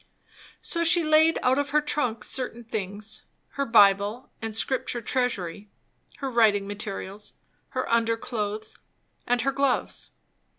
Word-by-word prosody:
So 335 Hz, -1 st, 0 dB
she 335 Hz, +1 st, +4 dB
laid 310 Hz, +1 st, +5 dB
out 260 Hz, +2 st, +3 dB
of 285 Hz, 0 st, -1 dB
her 300 Hz, +1 st, +4 dB
trunk 290 Hz, -6 st, -1 dB
certain 245 Hz, -2 st, -4 dB
things; 210 Hz, -1 st, -5 dB, 0.3 s
her 280 Hz, -, -2 dB
Bible 205 Hz, +1 st, +4 dB
and 220 Hz, -1 st, -4 dB
Scripture 245 Hz, +1 st, 0 dB
Treasury; 210 Hz, -6 st, -2 dB, 0.5 s
her 270 Hz, -2 st, -4 dB
writing 215 Hz, -4 st, +4 dB
materials; 205 Hz, 0 st, -6 dB, 0.4 s
her 255 Hz, -, 0 dB
underclothes; 225 Hz, -2 st, -1 dB, 0.5 s
and 245 Hz, 0 st, +2 dB
her 275 Hz, +4 st, +1 dB
gloves. 275 Hz, -1 st, 0 dB
230 Hz, 125 wpm, -26 LUFS, 210-270 Hz, 0.5 s, laid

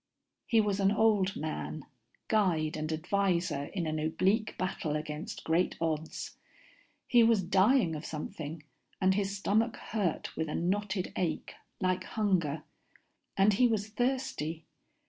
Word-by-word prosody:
_He 225 Hz, -2 st, +5 dB
was 205 Hz, -1 st, 0 dB
an 195 Hz, 0 st, +4 dB
old 210 Hz, -3 st, +3 dB
man, 155 Hz, -1 st, -4 dB, 0.4 s
guide 175 Hz, -8 st, +2 dB
and 155 Hz, 0 st, -3 dB
adviser 175 Hz, -3 st, 0 dB
in 175 Hz, +2 st, -3 dB
an 155 Hz, 0 st, -1 dB
oblique 185 Hz, +8 st, +1 dB
battle 165 Hz, -4 st, -2 dB
against 150 Hz, 0 st, -5 dB
great 165 Hz, +3 st, +1 dB
odds. 160 Hz, -1 st, -3 dB, 0.7 s
He 240 Hz, -2 st, +5 dB
was 225 Hz, -4 st, +4 dB
dying 190 Hz, +1 st, +4 dB
of 150 Hz, -, -6 dB
something 155 Hz, 0 st, -6 dB, 0.4 s
and 190 Hz, 0 st, +4 dB
his 200 Hz, 0 st, -1 dB
stomach 220 Hz, +4 st, +1 dB
hurt 200 Hz, -7 st, -2 dB
with 160 Hz, -1 st, -2 dB
a -, -, -2 dB
knotted 190 Hz, +1 st, -1 dB
ache, 175 Hz, -3 st, -2 dB, 0.3 s
like 185 Hz, -1 st, +1 dB
hunger, 170 Hz, -9 st, 0 dB, 0.7 s
and 195 Hz, +2 st, +5 dB
he 245 Hz, +5 st, +5 dB
was 215 Hz, -2 st, -1 dB
thirsty. 215 Hz, -, -2 dB
185 Hz, 135 wpm, -31 LUFS, 160-210 Hz, 0.7 s, He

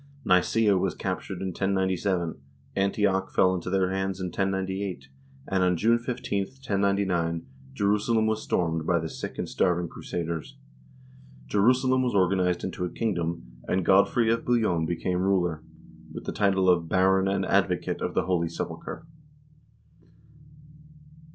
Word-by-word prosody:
Nicsea 100 Hz, +2 st, +3 dB
was -, -, -1 dB
captured -, -, -4 dB
in 95 Hz, -, -2 dB
1097, 95 Hz, -3 st, -1 dB, 0.4 s
Antioch 95 Hz, -1 st, +1 dB
fell 95 Hz, 0 st, +3 dB
into 90 Hz, -1 st, -3 dB
their 95 Hz, 0 st, +1 dB
hands 95 Hz, 0 st, -2 dB
in 90 Hz, -1 st, -3 dB
1098, 95 Hz, -5 st, -2 dB, 0.4 s
and 95 Hz, -1 st, 0 dB
on 90 Hz, -1 st, +2 dB
June 115 Hz, +5 st, +3 dB
15, 120 Hz, -5 st, -2 dB
1099, 100 Hz, -9 st, -1 dB, 0.3 s
Jerusalem 105 Hz, -, +2 dB
was 110 Hz, 0 st, 0 dB
stormed 80 Hz, -2 st, -1 dB
by 85 Hz, -, +3 dB
the 80 Hz, -1 st, -2 dB
sick -, -, -7 dB
and -, -, -3 dB
starving 90 Hz, -1 st, +1 dB
crusaders. 85 Hz, -1 st, -5 dB, 0.9 s
Jerusalem 130 Hz, -, +3 dB
was 125 Hz, -4 st, 0 dB
or 95 Hz, -2 st, +5 dB
ganized 90 Hz, -1 st, 0 dB
into 95 Hz, -1 st, -4 dB
a 90 Hz, -, -1 dB
kingdom, 85 Hz, -, -2 dB, 0.2 s
and 90 Hz, -1 st, 0 dB
Godfrey 110 Hz, +4 st, +4 dB
of 115 Hz, 0 st, 0 dB
Bouillon 105 Hz, -10 st, +1 dB
became 90 Hz, +2 st, -1 dB
ruler, 90 Hz, -4 st, +1 dB, 0.5 s
with -, -, -7 dB
the -, -, -4 dB
title 95 Hz, -2 st, +2 dB
of 85 Hz, -3 st, +3 dB
"Baron 95 Hz, +1 st, +3 dB
and 95 Hz, 0 st, 0 dB
Advocate 95 Hz, -2 st, 0 dB
of -, -, -3 dB
the -, -, +2 dB
Holy 85 Hz, -3 st, 0 dB
Sepulchre." 85 Hz, -, -6 dB
95 Hz, 140 wpm, -27 LUFS, 90-100 Hz, 0.9 s, or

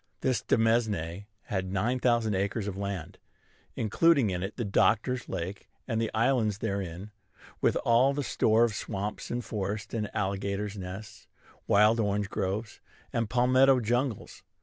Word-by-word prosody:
This 125 Hz, -4 st, +1 dB
demesne 105 Hz, -5 st, +1 dB, 0.2 s
had 95 Hz, -3 st, -3 dB
nine 115 Hz, +7 st, 0 dB
thousand 120 Hz, -3 st, +2 dB
acres 100 Hz, +2 st, -1 dB
of 100 Hz, -, -4 dB
land, 100 Hz, -4 st, -5 dB, 0.6 s
including 135 Hz, -, +3 dB
in 90 Hz, -1 st, -2 dB
it 95 Hz, +3 st, -4 dB
the 120 Hz, -, -2 dB
Doctor's 115 Hz, +5 st, +1 dB
Lake 90 Hz, +4 st, -5 dB, 0.2 s
and 115 Hz, -3 st, 0 dB
the 115 Hz, -, 0 dB
islands 115 Hz, -3 st, +1 dB
therein, 100 Hz, -2 st, -4 dB, 0.5 s
with -, -, +3 dB
all 120 Hz, +4 st, +5 dB
the 140 Hz, +1 st, -2 dB
store 115 Hz, -2 st, +3 dB
of 115 Hz, -2 st, +2 dB
swamps 105 Hz, -1 st, -4 dB
and 120 Hz, 0 st, -3 dB
forests 105 Hz, 0 st, -4 dB
and 105 Hz, -2 st, -2 dB
alligators' 100 Hz, 0 st, -2 dB
nests, 100 Hz, +3 st, -8 dB, 0.4 s
wild 105 Hz, +3 st, +5 dB
orange 100 Hz, -1 st, 0 dB
groves, 100 Hz, +4 st, -3 dB, 0.3 s
and 115 Hz, -2 st, 0 dB
palmetto 130 Hz, +2 st, +4 dB
jungles. 120 Hz, 0 st, -2 dB
110 Hz, 145 wpm, -29 LUFS, 100-120 Hz, 0.6 s, all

